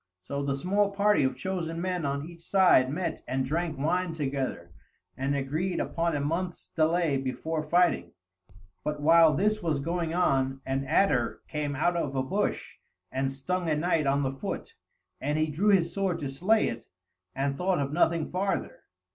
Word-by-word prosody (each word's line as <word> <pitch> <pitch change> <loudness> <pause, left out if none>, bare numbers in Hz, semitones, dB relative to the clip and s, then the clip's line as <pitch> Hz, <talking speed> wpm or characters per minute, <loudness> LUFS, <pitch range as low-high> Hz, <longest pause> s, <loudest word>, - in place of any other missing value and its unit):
So 140 +10 -4
the 140 -1 -1
small 195 +7 +1
party 205 -3 +3
of 130 - -1
chosen 170 -4 -3
men 180 -2 -2
on 140 +1 -2
each 170 -1 -12
side 180 -8 +4
met 170 +6 -3
and 130 0 -1
drank 160 +2 -2
wine 165 +4 0
together, 135 - -3 0.4
and 135 +2 -1
agreed 155 +7 -1
upon 170 -1 -1
a - - 0
month's 170 +5 -3
delay 160 -2 +2
before 155 +4 -3
fighting; 175 +3 +2 0.7
but 150 -1 -2
while 160 0 +6
this 215 +5 +1
was 160 -5 0
going 165 +2 -2
on 135 -6 +1
an 135 +1 -1
adder 130 -5 +2
came 150 -2 -3
out 175 +5 +1
of 145 -5 -2
a 130 - +1
bush 195 +10 -2 0.3
and 135 +1 -1
stung 170 +6 -2
a 155 - +2
knight 155 -1 +1
on 140 +1 +2
the 135 0 -1
foot, 135 - -5 0.5
and 150 +3 0
he 155 0 +1
drew 190 +8 +1
his 175 -4 +3
sword 195 -3 0
to 140 - -4
slay 185 +11 +2
it 115 0 -6 0.5
and 140 +1 0
thought 180 +3 +1
of 140 0 -2
nothing 165 -1 +2
farther. 195 - -2
160 Hz, 175 wpm, -28 LUFS, 140-180 Hz, 0.7 s, while